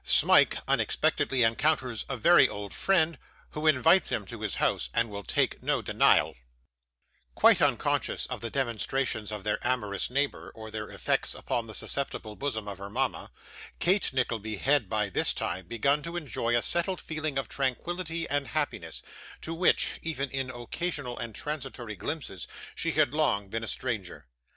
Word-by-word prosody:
Smike - - +5
unexpectedly 130 -2 +2
encounters 125 0 +1
a - - -2
very - - +6
old 100 0 -6
Friend, 170 -4 +2 0.3
who 155 +1 -2
invites 160 +5 +5
him 105 - -2
to 115 +3 -9
his 105 -4 -2
House, - - 0
and 115 -2 +1
will 100 0 -6
take - - 0
no - - 0
Denial - - +4 1.0
Quite - - +6
unconscious - - +1
of - - -5
the 115 - -3
demonstrations 120 -3 -1
of 105 -2 -5
their 105 - 0
amorous 105 -7 0
neighbour, 140 +3 -1
or 110 -1 -9
their 110 0 -5
effects - - 0
upon 115 -1 -2
the 110 - -7
susceptible 115 -6 -3
bosom 110 -6 -3
of 100 -2 -6
her 100 0 -7
mama, 100 - -2 0.5
Kate 190 +3 +2
Nickleby 115 -4 -1
had, 135 -3 +2
by 105 -1 +1
this 95 - +2
time, 95 -2 -3
begun 140 +7 +1
to 170 +3 -5
enjoy 120 -7 0
a 120 - 0
settled 175 +2 +1
feeling 155 -3 -3
of 135 - -1
tranquillity 165 +5 -2
and 145 -1 -1
happiness, 150 +4 -3 0.4
to 165 - -4
which, 175 +2 +2
even 140 -5 -3
in 135 -1 -2
occasional 130 +2 -4
and 115 -2 -6
transitory 135 -7 -5
glimpses, 135 - -5 0.3
she 165 -1 -1
had 150 -3 +3
long 105 -11 +1
been 115 +2 -3
a - - -4
stranger. 110 - -3
130 Hz, 165 wpm, -28 LUFS, 110-150 Hz, 1.0 s, very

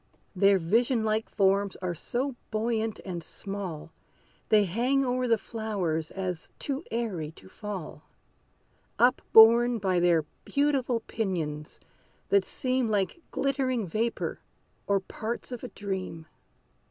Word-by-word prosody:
Their 195 +1 +5
vision 225 +7 +2
like 220 0 0
forms 200 0 +2
are 180 -2 -3
so 250 - -3
buoyant 220 0 -1
and 175 -3 -5
small 190 -6 -6 0.6
They 215 -1 +6
hang 245 +9 +1
o'er 250 0 0
the 230 -1 +4
flowers, 200 -9 -2
as 180 -3 -4
too 280 +2 -3
airy 210 -10 -2
to 95 - -15
fall, 190 - -7 1.0
Up 250 +2 +4
borne 235 +2 +8
by 190 -4 +1
their 170 -3 +3 0.2
beautiful 275 -5 +1
pinions, 160 -10 -3 0.5
that 200 -1 +4
seem 255 +3 -1
Like 205 - 0
glittering 260 -5 0
vapor, 220 +7 -2 0.5
or 200 -1 +2
parts 225 +6 -5
of 245 - -6
a - - -3
dream. 190 -6 -5
215 Hz, 125 wpm, -28 LUFS, 185-240 Hz, 1.0 s, borne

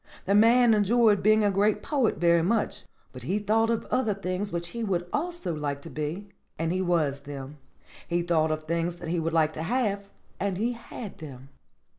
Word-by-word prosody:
"The 195 - +1
man 230 +3 +6
enjoyed 215 0 +4
being 215 +1 +4
a 205 - +3
great 205 +2 +1
poet 275 -7 +1
very 170 -1 +4
much, 215 +7 -1 0.3
but - - -10
he 195 - -1
thought 220 +2 +2
of 230 -1 -1
other 225 -6 +1
things 195 +1 -3
which 170 0 -3
he 235 +3 -5
would 175 -4 -1
also 340 - -2
like 145 -2 -3
to - - -9
be, 155 +7 -4 0.3
and 165 +2 -1
he 185 - 0
was 160 -6 +1
them. 140 0 -9 0.5
He 175 0 0
thought 160 -2 +2
of 155 0 -2
things 170 +2 -1
that 175 -1 -7
he 170 0 0
would 165 0 -1
like 155 -1 +2
to 155 - -5
have, 200 0 -1 0.3
and 195 -2 -1
he 230 +5 0
had 230 -2 -9
them. 135 -4 -10
185 Hz, 200 wpm, -27 LUFS, 165-215 Hz, 0.5 s, man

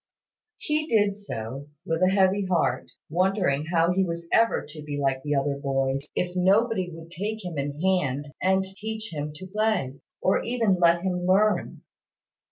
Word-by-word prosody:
He 305 0 -1
did 205 -5 +2
so, 135 - -6 0.2
with 165 +1 -1
a 185 - +5
heavy 190 0 +2
heart, 160 -8 0 0.2
wondering 180 -4 +1
how 170 0 +3
he 190 +1 +2
was 170 -2 -4
ever 230 0 +3
to 150 +1 -9
be 145 -1 -5
like 135 -1 0
the 145 +1 -1
other 140 0 0
boys, 135 0 -1
if 180 0 -1
nobody 190 +1 +2
would 165 0 -11
take 210 +4 -4
him 170 -5 -4
in 145 +1 -3
hand, 150 -6 0
and 190 +1 +3
teach 215 +2 -6
him 150 0 -3
to 185 - -8
play, 195 -9 -1 0.2
or 190 - +2
even 225 -6 +1
let 170 0 +4
him 180 -1 -1
learn. 210 +3 +2
180 Hz, 170 wpm, -26 LUFS, 145-195 Hz, 0.2 s, a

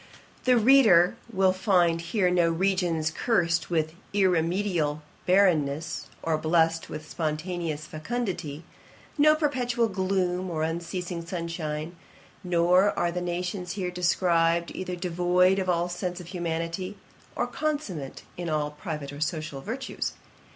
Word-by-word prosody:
'The 250 -1 +5
reader 220 -8 +6 0.2
will 190 -2 +3
here 185 0 -8
find 180 0 +2
no 170 -2 +4
regions 170 -3 +1
cursed 170 -4 +1
with 160 -2 0 0.2
irremediable 175 -4 +1 0.2
barrenness, 165 -5 +2 0.2
or 160 -1 0
blessed 165 0 +2
with 155 0 -7
spontaneous 155 0 -3
fecundity; 170 -4 -4 0.6
no 305 +1 +6
perpetual 250 -6 +1
gloom, 185 -2 -1
or 160 -2 -2
unceasing 170 +1 -3
sunshine; 165 -2 -4 0.5
nor 180 +3 +3
are 175 0 +1
the 180 +1 -3
nations 180 +1 -3
here 185 -3 -3
described 170 -1 +2
either 180 -1 -4
devoid 180 +1 +2
of 185 -1 -1
all 175 0 +2
sense 180 0 -4
of 180 - -9
humanity, 170 +2 -3 0.4
or - - 0
consummate 245 - -3
in 175 -1 -3
all 150 -1 0
private 150 -1 -6
or 145 - -8
social 155 -3 -3
virtues. 255 - -4
175 Hz, 125 wpm, -27 LUFS, 165-190 Hz, 0.6 s, reader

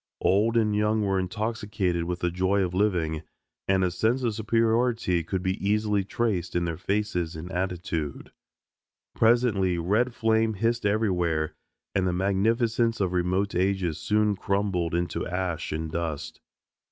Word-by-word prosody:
Old 110 +5 +3
and 105 -2 +2
young 105 +1 +2
were 95 -1 +1
intoxicated 100 -3 -2
with 90 +2 -3
the 90 - +1
joy 95 +3 +1
of 90 -1 -2
living, 90 -6 +1 0.5
and 95 -1 +3
a 90 - +1
sense 115 +8 +1
of 115 -3 +1
superiority 115 -4 +1
could 90 +3 -3
be 95 0 -2
easily 105 0 +1
traced 95 -5 -2
in 85 0 +1
their 85 -1 -3
faces 95 -4 -1
and 85 +4 -7
attitude. 90 -5 -3 0.8
Presently 110 -6 +3
red 110 +9 +1
flame 110 -1 +2
hissed 115 +1 0
everywhere, 90 -7 0 0.4
and 95 -1 +1
the 90 - 0
magnificence 115 +5 +1
of 95 -2 0
remote 90 +3 0
ages 90 -3 0
soon 105 -1 +2
crumbled 95 -4 -1
into 85 0 -2
ash 90 -2 -2
and 80 0 -3
dust. 80 -3 -4
95 Hz, 145 wpm, -26 LUFS, 90-110 Hz, 0.8 s, Old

